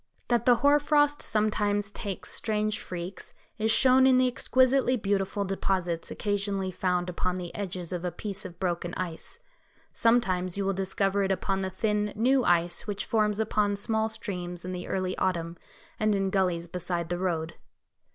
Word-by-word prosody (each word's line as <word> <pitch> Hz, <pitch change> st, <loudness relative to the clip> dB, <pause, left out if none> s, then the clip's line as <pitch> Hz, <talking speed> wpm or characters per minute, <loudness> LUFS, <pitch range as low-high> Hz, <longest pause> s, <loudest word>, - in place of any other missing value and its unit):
That 240 Hz, -1 st, +1 dB
the 245 Hz, -, +7 dB
hoar 285 Hz, +4 st, +4 dB
frost 290 Hz, 0 st, +2 dB
sometimes 210 Hz, -1 st, 0 dB
takes 200 Hz, -3 st, -5 dB
strange 215 Hz, -1 st, 0 dB
freaks 180 Hz, +1 st, -7 dB, 0.2 s
is 220 Hz, +1 st, +1 dB
shown 260 Hz, +3 st, +5 dB
in 260 Hz, -1 st, +5 dB
the 255 Hz, 0 st, +4 dB
exquisitely 255 Hz, +1 st, +3 dB
beautiful 200 Hz, -1 st, -1 dB
deposits 185 Hz, -3 st, -1 dB
occasionally 200 Hz, -2 st, -1 dB
found 180 Hz, -1 st, 0 dB
upon 180 Hz, +1 st, -2 dB
the 175 Hz, -2 st, -6 dB
edges 185 Hz, -3 st, -4 dB
of 175 Hz, -1 st, -3 dB
a 180 Hz, -, -1 dB
piece 195 Hz, +3 st, -4 dB
of 175 Hz, -2 st, -10 dB
broken 175 Hz, -2 st, -2 dB
ice. 170 Hz, -3 st, -5 dB, 0.6 s
Sometimes 190 Hz, -6 st, +2 dB
you 200 Hz, -, -1 dB
will 195 Hz, -, +1 dB
discover 195 Hz, +1 st, 0 dB
it 195 Hz, 0 st, +1 dB
upon 195 Hz, +1 st, -1 dB
the 190 Hz, -, -2 dB
thin, 210 Hz, +1 st, -1 dB
new 255 Hz, +4 st, +3 dB
ice 175 Hz, +1 st, +1 dB
which 205 Hz, -1 st, -3 dB
forms 210 Hz, -2 st, +1 dB
upon 210 Hz, -2 st, +1 dB
small 220 Hz, +2 st, 0 dB
streams 180 Hz, -5 st, -5 dB
in 185 Hz, -, -4 dB
the 180 Hz, -1 st, -5 dB
early 185 Hz, -1 st, -1 dB
autumn, 170 Hz, -2 st, -1 dB, 0.4 s
and 215 Hz, -1 st, +2 dB
in 195 Hz, -1 st, 0 dB
gullies 180 Hz, -3 st, 0 dB
beside 175 Hz, -1 st, -3 dB
the 175 Hz, 0 st, -2 dB
road. 170 Hz, -3 st, -1 dB
195 Hz, 170 wpm, -28 LUFS, 180-215 Hz, 0.6 s, the